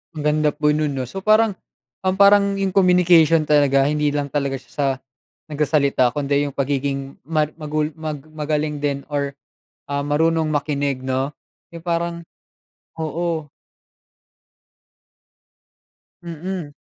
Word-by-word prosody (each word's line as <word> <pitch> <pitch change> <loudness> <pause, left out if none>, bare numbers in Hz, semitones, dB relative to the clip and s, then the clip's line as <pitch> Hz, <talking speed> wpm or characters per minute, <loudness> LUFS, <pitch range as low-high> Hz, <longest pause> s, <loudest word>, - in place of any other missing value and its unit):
Ang 150 - -5
ganda 150 0 +2
po 150 +1 -1
non 150 -1 0
'no, 130 -2 -3
so 190 +9 -7
parang, 215 -1 +4 0.5
um, 185 0 +2
parang 200 0 +6
yung 195 -1 -1
communication 175 -4 +5
talaga 140 -2 +4
hindi 150 0 +1
lang 145 0 -1
talaga 140 -1 -2
siya 130 - -24
sa, 145 - 0 0.7
nagsasalita 140 -4 +2
kundi 145 0 0
yung 140 - -7
pagiging 140 0 -2
mag 155 -1 0
magul 155 0 -1
mag 155 -3 -5
magaling 150 -1 -2
din 140 -1 -2
or, 140 -1 -2 0.5
ah, 140 0 -2
marunong 160 +2 +1
makinig 145 -2 -1
'no, 130 +2 -1 0.4
yung 170 - -8
parang 170 0 -2 0.8
oo. 160 -1 -2 2.7
Mm. 170 -1 -5
150 Hz, 125 wpm, -21 LUFS, 140-165 Hz, 2.7 s, parang